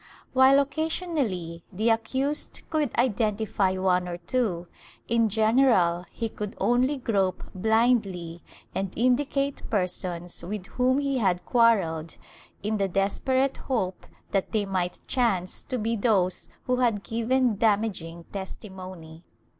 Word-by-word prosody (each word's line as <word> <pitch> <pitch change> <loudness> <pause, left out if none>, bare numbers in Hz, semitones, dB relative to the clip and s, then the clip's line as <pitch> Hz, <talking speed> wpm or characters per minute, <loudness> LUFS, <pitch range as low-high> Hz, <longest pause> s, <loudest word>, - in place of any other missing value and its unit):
While 265 +1 +6
occasionally 280 - -2
the 220 +4 +1
accused 260 +6 -1
could 305 -4 +1
identify 215 -4 +1
one 180 -1 +2
or 175 -1 -4
two, 180 -2 -1 0.4
in 230 -1 +2
general 215 -6 +3
he 230 - -3
could 210 0 -6
only 255 +4 +2
grope 195 -7 0
blindly 195 -5 +1 0.3
and 195 -1 -2
indicate 275 +3 +1
persons 180 -4 -2
with 190 +1 -5
whom 255 +6 +1
he 275 -2 0
had 185 -5 +1
quarrelled, 190 -10 +2 0.5
in 215 +1 0
the 195 -1 +1
desperate 260 +8 +1
hope 190 -8 -2 0.2
that 195 +2 -1
they 210 -2 +1
might 185 -2 -2
chance 200 -8 0
to 255 - -3
be 230 +1 -1
those 200 -5 +1
who 250 0 0
had 230 -5 +1
given 235 0 +1
damaging 200 -6 0
testimony. 185 -4 -8
215 Hz, 120 wpm, -26 LUFS, 185-250 Hz, 0.5 s, While